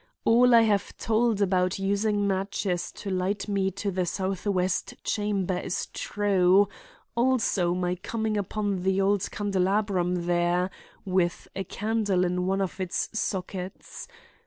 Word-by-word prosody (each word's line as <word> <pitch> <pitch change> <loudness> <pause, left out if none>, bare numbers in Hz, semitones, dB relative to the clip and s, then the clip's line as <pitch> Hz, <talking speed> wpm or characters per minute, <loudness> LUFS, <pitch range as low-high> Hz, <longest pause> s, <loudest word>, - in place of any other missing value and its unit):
All 240 +1 +6
I 230 - +8
have 210 -3 +1
told 225 -2 +1
about 185 -1 +1
using 205 +1 +1
matches 195 -2 -1
to 195 - -6
light 185 +3 -1
me 195 -2 +1
to 200 +2 -3
the 180 -1 -1
southwest 190 0 -1
chamber 200 -3 0
is 180 - -3
true, 200 -1 +3 0.5
also 235 -8 +2
my 180 0 0
coming 220 +4 -2
upon 205 -1 -1
the 190 +1 +1
old 200 0 +1
candelabrum 190 -3 0
there, 175 +1 +1 0.3
with 185 -2 0
a 195 - -2
candle 205 -2 0
in 180 +1 -1
one 195 +1 +1
of 190 0 -3
its 185 -2 -2
sockets. 190 - -4
195 Hz, 135 wpm, -27 LUFS, 180-205 Hz, 0.5 s, I